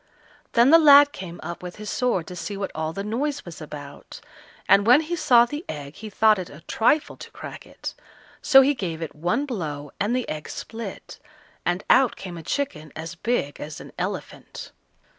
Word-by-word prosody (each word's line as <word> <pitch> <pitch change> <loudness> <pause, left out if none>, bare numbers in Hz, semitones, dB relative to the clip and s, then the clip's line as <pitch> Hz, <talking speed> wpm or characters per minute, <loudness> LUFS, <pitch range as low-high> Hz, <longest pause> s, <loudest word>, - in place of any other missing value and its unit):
Then 240 +3 +5
the 330 - +9
lad 290 -2 +8
came 175 -7 -8
up 170 +2 -6
with 180 -1 -7
his 210 0 -6
sword 240 -10 0
to 180 - -8
see 200 +3 -5
what 195 -1 -3
all 155 0 -2
the 195 +4 -5
noise 280 +7 -2
was 170 -3 -10
about, 145 -2 -9 0.5
and 200 +2 +5
when 250 +6 +7
he 330 +2 -3
saw 240 -7 +5
the 295 +6 -6
egg, 145 -2 -6
he 215 +1 -8
thought 215 0 +4
it 180 - -6
a 150 - -13
trifle 285 - +1
to - - -10
crack - - -10
it; - - -7 0.5
so 270 -2 +7
he 285 +2 +3
gave 170 - -4
it 160 - -6
one 180 - -1
blow 150 - -5
and 215 +5 +1
the 255 - -1
egg 155 -1 -5
split, 230 0 -8 0.5
and 175 +2 0
out 255 -2 +5
came 180 -2 -8
a 165 - -7
chicken 155 - -3
as 160 +1 -6
big 170 -6 -2
as 150 0 -7
an - - -11
elephant. - - -6
200 Hz, 200 wpm, -24 LUFS, 160-255 Hz, 0.5 s, the